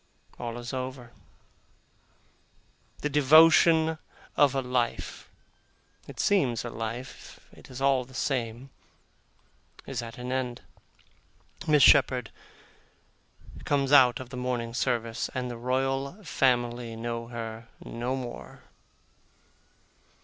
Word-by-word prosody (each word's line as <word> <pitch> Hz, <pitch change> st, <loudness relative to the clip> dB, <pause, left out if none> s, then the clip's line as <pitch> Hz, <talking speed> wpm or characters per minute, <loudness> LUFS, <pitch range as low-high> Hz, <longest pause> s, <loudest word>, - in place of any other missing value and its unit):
All 120 Hz, -1 st, -5 dB
is 120 Hz, +1 st, -7 dB
over. 130 Hz, -2 st, -5 dB, 1.9 s
The -, -, 0 dB
devotion 160 Hz, +2 st, +5 dB, 0.4 s
of 140 Hz, -2 st, +4 dB
a 135 Hz, -, +1 dB
life 125 Hz, -2 st, -2 dB, 0.8 s
it -, -, -11 dB
seems 130 Hz, -, +1 dB
a 120 Hz, -, -5 dB
life, 115 Hz, +3 st, -7 dB
it -, -, -16 dB
is 130 Hz, +1 st, -6 dB
all 135 Hz, -2 st, +3 dB
the 130 Hz, +1 st, -16 dB
same 125 Hz, 0 st, -3 dB, 1.1 s
is 130 Hz, -3 st, -4 dB
at 115 Hz, -1 st, -9 dB
an 125 Hz, 0 st, -5 dB
end; 125 Hz, -2 st, -2 dB, 1.1 s
Miss 150 Hz, -2 st, +5 dB
Shepherd 130 Hz, -4 st, +5 dB, 1.3 s
comes 140 Hz, -1 st, 0 dB
out 130 Hz, -4 st, +6 dB
of 125 Hz, -2 st, -9 dB
the 125 Hz, -, -6 dB
morning 125 Hz, -2 st, -3 dB
service, 115 Hz, -2 st, -1 dB
and 125 Hz, -1 st, -3 dB
the -, -, -6 dB
Royal 135 Hz, -, -2 dB
Family 120 Hz, -6 st, 0 dB
know 115 Hz, 0 st, -4 dB
her 115 Hz, -1 st, -7 dB, 0.2 s
no 120 Hz, +3 st, -3 dB
more. 125 Hz, -2 st, -8 dB
125 Hz, 110 wpm, -27 LUFS, 120-135 Hz, 1.9 s, out